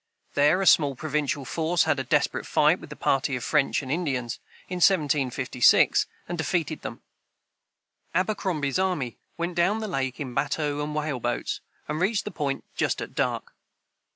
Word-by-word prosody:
There 150 +7 +4
a - - -1
small 145 -6 +5
provincial 150 -1 -2
force 165 +3 +1
had 140 - +1
a - - -1
desperate 145 +2 0
fight 155 +4 +3
with 150 - -12
a - - -6
party 135 -1 +1
of 125 - -4
French 150 -1 +1
and 130 - -5
Indians, 135 -8 -2 0.3
in 180 - -4
1756, 140 - +3 0.2
and 175 - -4
defeated 165 -1 -1
them. - - -7 1.1
Abercrombie's 185 -7 0
army 175 -11 -1 0.2
went 170 +1 -2
down 175 +5 +2
the 220 - -3
lake 135 -8 -2
in 130 -4 -5
batteaux 145 +2 -1
and 150 0 -4
whaleboats, 135 -6 -2 0.3
and 150 +1 -2
reached 200 +3 +1
the 210 - -4
Point 145 -5 -2
just - - 0
at - - -6
dark. - - -2
150 Hz, 160 wpm, -26 LUFS, 135-175 Hz, 1.1 s, small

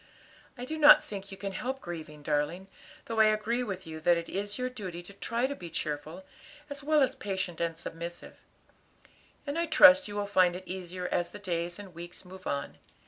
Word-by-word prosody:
"I 245 - -5
do 315 +4 -4
not 295 -1 +9
think 200 -1 -7
you 195 - -8
can 200 0 -4
help 260 +7 -3
grieving, 155 - -8
darling, 155 +6 -1 0.4
though 225 -1 -2
I 220 - +8
agree 215 +3 +1
with 190 -5 -5
you 160 -1 -7
that 170 +2 +4
it 170 0 -5
is 205 +1 -3
your 250 0 -1
duty 185 -9 -6
to 200 - -11
try 235 +4 -1
to 280 +2 -2
be 175 -8 -8
cheerful, 155 +3 -4 0.5
as 285 0 -5
well 300 0 +4
as 260 - +1
patient 190 -4 -3
and 165 -1 -1
submissive; 170 +1 -7 1.1
and 290 +3 -2
I 340 - 0
trust 285 -3 +8
you 205 - -7
will 205 0 -1
find 185 -3 +3
it 185 - -7
easier 180 -1 -5
as 175 -1 0
the - - -9
days 175 -3 -3
and 200 -3 -10
weeks 175 +3 -8
move 185 +1 -10
on. 140 0 -3
190 Hz, 205 wpm, -30 LUFS, 170-225 Hz, 1.1 s, not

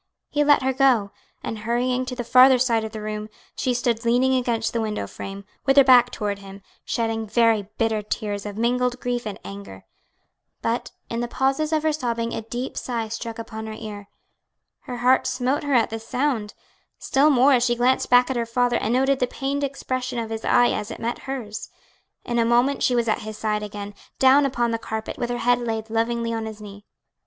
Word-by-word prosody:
He 295 0 +2
let 290 -2 +4
her 265 0 +1
go, 250 -7 +3 0.3
and 220 - -4
hurrying 250 +3 0
to 250 - -4
the 245 - -3
farther 255 +2 +7
side 235 -3 +1
of 220 - -5
the 215 -1 -7
room, 215 0 -4 0.3
she 255 - 0
stood 235 -1 0
leaning 245 +3 +3
against 240 -3 0
the 230 - 0
window 215 -1 -2
frame, 195 0 -8 0.2
with 270 +1 +4
her 275 - +10
back 250 -2 +6
toward 205 -4 -3
him, 195 0 -12 0.2
shedding 225 -2 -2
very 225 -2 +2
bitter 225 -2 +1
tears 205 -1 -3
of 205 0 -7
mingled 250 +2 0
grief 245 -2 -2
and 205 -2 -5
anger. 200 - -9 0.8
But 230 +2 -1 0.2
in 230 - -2
the 240 - -1
pauses 270 +5 0
of 310 -1 +1
her 315 -1 +2
sobbing 235 -5 -2
a - - -3
deep 240 +4 -5
sigh 230 -3 -3
struck 230 0 -5
upon 220 -1 -7
her 220 - -5
ear. 205 -2 -8 0.8
Her 245 - -5
heart 250 +2 +3
smote 255 +3 0
her 285 -2 0
at 235 -1 +3
the 225 - -3
sound; 230 -2 -2 0.4
still 285 +3 +3
more 275 0 +5
as 245 -2 +3
she 240 -1 +2
glanced 250 +2 +2
back 245 +1 +5
at - - -2
her 235 -1 -1
father 245 +1 +1
and 235 - 0
noted 270 +1 +2
the 250 - +1
pained 280 +2 -3
expression 255 -2 -3
of 225 -1 -3
his 225 0 -4
eye 245 - +4
as 210 - -3
it 230 - -6
met 235 +1 -3
hers. 225 -6 -5 0.6
In 240 0 -1
a - - +4
moment 240 +4 +2
she 250 - +2
was 235 -1 +1
at 215 - +1
his 215 -2 -7
side 210 -1 -1
again, 205 -1 -7 0.2
down 270 +2 +5
upon 240 -3 0
the 230 - -1
carpet, 220 -1 -5
with 240 - -2
her 245 - -1
head 245 +1 +2
laid 225 -2 -4
lovingly 230 +1 0
on 225 -1 -3
his 220 -1 -8
knee. 205 0 -11
235 Hz, 215 wpm, -23 LUFS, 220-255 Hz, 0.8 s, her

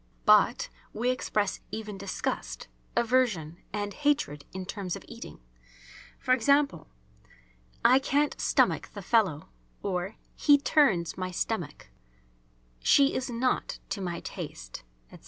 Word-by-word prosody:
But - - +5 0.2
we 240 +4 +1
express 210 -5 -1
even 215 -2 -5
disgust, 185 - -4 0.3
aversion 230 -10 +1
and 205 0 -3
hatred 290 - 0
in 190 0 -6
terms 195 -2 -4
of - - -10
eating, - - -10 0.9
e.g., 255 +1 +4 1.3
"I 255 +3 +7
can't 285 +2 0
stomach - - +2
the - - -6
fellow," 190 -10 +2 0.3
or, 190 +1 -2 0.2
"he 290 -1 +6
turns 235 - +2
my 185 0 -2
stomach," 175 -4 -3 0.9
"she 275 - +5
is 260 0 -2
not 245 +2 0
to 200 - -3
my 175 -2 -3
taste," - - -7 0.3
etc. - - -12
210 Hz, 120 wpm, -28 LUFS, 180-255 Hz, 1.3 s, I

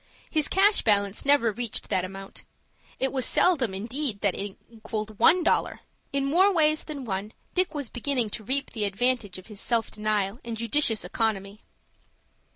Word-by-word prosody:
His 310 -3 +2
cash 400 +2 +4
balance 200 0 +1
never 280 -5 +5
reached 235 +1 -3
that 185 - +1
amount. 195 +1 -8 0.6
It 265 - 0
was 265 -2 -1
seldom, 260 - +2
indeed, 230 +2 -2
that 200 -3 +2
it 200 0 -6
equalled 215 -2 -6
one 345 +9 +5
dollar. - - 0 0.3
In 275 0 -1
more 360 +8 +4
ways 310 -3 +2
than 285 -4 -6
one 200 0 -4 0.2
Dick 370 -3 0
was 285 -4 -2
beginning 245 -2 -1
to 215 - -5
reap 275 +5 0
the 215 -3 -2
advantage 210 -1 0
of 185 - -12
his 210 -3 -10
self 230 -2 0
denial 210 0 -1
and 230 -1 -5
judicious 230 0 +2
economy. 210 -2 -2
230 Hz, 165 wpm, -26 LUFS, 205-280 Hz, 0.6 s, never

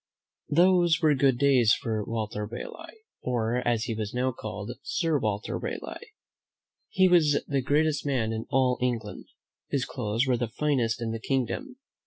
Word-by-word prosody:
Those 175 0 +4
were 155 -3 +4
good 135 -2 +3
days 130 -5 +4
for 110 -2 -2
Walter 105 -1 -3
Raleigh, 330 - -9 0.2
or, 120 -1 0
as 115 -2 +1
he 115 - -2
was 110 0 -4
now 130 +1 +1
called. 105 -1 -6
Sir 165 -1 0
Walter 105 -3 -2
Raleigh. 470 -2 -6 0.8
He 190 0 +4
was 155 -5 +4
the 140 -2 0
greatest 145 +2 +1
man 125 -6 0
in 110 0 -5
all 130 -1 +2
England. 115 -4 -2 0.4
His 135 -2 0
clothes 115 -2 -1
were 130 -2 +2
the 120 0 -1
finest 120 -3 0
in 115 - -2
the 115 - -4
kingdom. 135 - -2
125 Hz, 160 wpm, -27 LUFS, 115-150 Hz, 0.8 s, Those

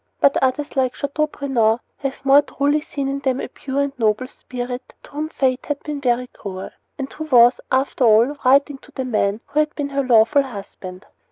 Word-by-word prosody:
But 280 - +4
others, 265 +3 -1
like 260 -2 +1
Chateaubriand, 280 -6 0 0.2
have 275 0 -5
more 275 +1 +7
truly 290 +1 0
seen 280 -2 -4
in 275 +1 -2
them 265 -2 -1
a - - -4
pure 275 0 -3
and 280 -2 -3
noble 220 +2 +1
spirit 250 0 -7
to - - -16
whom 305 +2 -4
fate 260 -4 -1
had 295 -1 -3
been 295 -2 -5
very 250 -1 +1
cruel; 190 -6 -8 0.3
and 270 -1 -5
who 315 - -6
was, 245 -4 +5
after 265 0 +1
all, 230 +5 +5
writing 275 +2 +3
to - - -19
the 260 - -3
man 215 -3 0
who 300 - 0
had 305 0 0
been 285 -2 -3
her 275 0 0
lawful 235 +2 +4
husband. 200 -6 -9
265 Hz, 195 wpm, -21 LUFS, 245-280 Hz, 0.3 s, more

